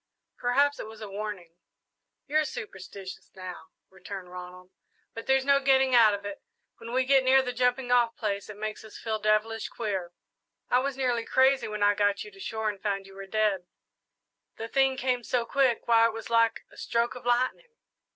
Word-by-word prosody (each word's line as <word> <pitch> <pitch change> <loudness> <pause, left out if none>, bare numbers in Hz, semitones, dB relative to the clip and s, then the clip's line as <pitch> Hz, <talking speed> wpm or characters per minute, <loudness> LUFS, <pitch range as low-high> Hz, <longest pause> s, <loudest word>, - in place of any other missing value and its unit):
"Perhaps 280 +4 +2
it - - -5
was 220 0 -11
a 215 - -7
warning." 200 -4 -6 0.7
"You're 310 +2 +2
superstitious, 195 -7 -8
now," 185 -3 -8 0.2
returned 190 -1 -9
Ronald; 180 0 -10 0.4
"but 225 - -8
there's 265 0 +3
no 280 0 +5
getting 265 -1 +3
out 225 -4 +6
of 200 0 -9
it 205 -1 -6 0.4
when 230 - -9
we 255 +1 +2
get 270 0 +4
near 265 +1 +5
the 250 -1 -3
jumping 250 +1 +1
off 240 -2 +3
place 200 -2 -3
it 210 - -8
makes 215 0 -5
us 220 - -11
feel 220 -1 -3
devilish 215 +1 +1
queer. 190 -6 -3 0.6
I 250 - +5
was 270 0 -2
nearly 245 -3 0
crazy 265 +2 +3
when 210 -1 -2
I 205 0 +5
got 205 -1 +1
you 420 - -11
to 390 - -17
shore 220 - -3
and 205 -2 -3
found 195 -2 -2
you 195 - -14
were 195 0 -9
dead 200 -3 0 0.9
the 225 - -5
thing 270 +2 +2
came 250 -1 0
so 240 0 0
quick, 260 -1 +1
why, 230 -1 +6
it 230 - -4
was 225 +1 -8
like 230 -1 +2
a - - -17
stroke 235 0 0
of 250 - -10
lightning." 255 - 0
225 Hz, 195 wpm, -28 LUFS, 205-255 Hz, 0.9 s, out